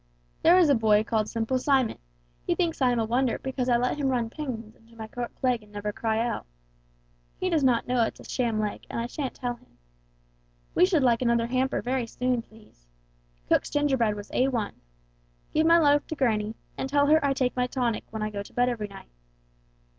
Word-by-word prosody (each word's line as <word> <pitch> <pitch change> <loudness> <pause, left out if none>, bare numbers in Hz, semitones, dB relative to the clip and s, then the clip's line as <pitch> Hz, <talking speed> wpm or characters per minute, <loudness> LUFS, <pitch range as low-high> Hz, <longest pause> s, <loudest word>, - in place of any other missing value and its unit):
There 345 +3 +6
is 360 -3 +6
a 285 - +5
boy 215 -3 +4
called 220 -1 -1
'Simple 230 +3 -1
Simon,' 265 -3 +1 0.5
he - - +2
thinks 330 -4 -1
I 255 - +4
am 245 - +1
a 225 - +1
wonder 245 +2 +1
because 260 -1 -3
I 240 - +4
let 250 +3 0
him 280 - +1
run 240 -3 0
pins 235 -8 -6
into 230 +1 -22
my 220 -1 -7
cork 240 +2 -5
leg 250 -3 +2
and 210 -1 -19
never 205 0 -4
cry 225 0 -1
out. 230 - -2 0.9
He 370 0 -1
does 315 -4 +2
not 250 -3 +3
know 250 -1 +2
it's 225 - -1
a - - -11
sham 235 -4 -1
leg 210 -1 -2
and - - -3
I 230 - -1
shan't 265 +2 -4
tell 245 -2 -3
him. 250 - -27 1.0
We 365 - +5
should 335 -7 +2
like 240 -2 +3
another 235 -1 +2
hamper 255 +2 0
very 250 -1 -1
soon, 250 +1 -1
please. 215 - -21 0.6
Cook's - - +2
gingerbread 265 -7 +1
was 205 0 -9
A1. 250 -5 0 0.8
Give 310 +1 +3
my 335 0 +7
love 290 -3 +3
to 315 - -4
granny, 220 -5 0 0.2
and 265 - -2
tell 285 +1 +3
her 310 +1 +4
I 280 -1 +2
take 255 -2 0
my 250 -1 +1
tonic 245 -4 -1
when 220 -1 -4
I 215 - -2
go 200 -1 -4
to 200 - -12
bed 245 0 +2
every 225 -4 -3
night. 195 - -13
245 Hz, 215 wpm, -27 LUFS, 225-265 Hz, 1.0 s, my